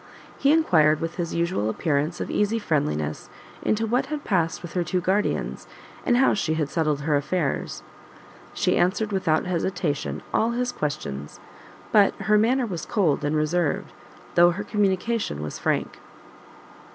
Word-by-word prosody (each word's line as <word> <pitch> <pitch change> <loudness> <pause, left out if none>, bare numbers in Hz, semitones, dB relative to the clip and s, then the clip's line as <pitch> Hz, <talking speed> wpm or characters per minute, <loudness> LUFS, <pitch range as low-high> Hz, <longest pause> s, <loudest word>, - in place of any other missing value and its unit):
He 280 - +4
enquired, 155 - +4
with 165 +1 -4
his 170 -2 -3
usual 170 - 0
appearance 150 +5 -1
of - - -4
easy 210 +2 +1
friendliness, 75 - -1 0.3
into 220 +1 +1
what 250 +4 0
had 300 0 -4
passed 170 -5 0
with 175 - -8
her 180 - +1
two 180 +2 -1
guardians, 190 +4 -1 0.4
and 245 -3 +3
how 265 - +4
she 160 -6 0
had 150 -3 -1
settled 155 -3 0
her 150 +1 +1
affairs. 145 - -1 0.7
She - - +1
answered 205 +4 +1
without 180 -5 +1
hesitation 180 -4 -2
all 230 +2 +2
his 250 +1 -1
questions, 75 - -4 0.5
but 205 -2 +5
her 210 +1 +2
manner 250 +4 +2
was 175 -7 -5
cold 165 -9 +1
and 145 +1 0
reserved, 155 +1 0 0.4
though 175 0 +6
her 185 +4 -3
communication 205 - 0
was 75 - -6
frank. - - -1
175 Hz, 150 wpm, -24 LUFS, 155-210 Hz, 0.7 s, though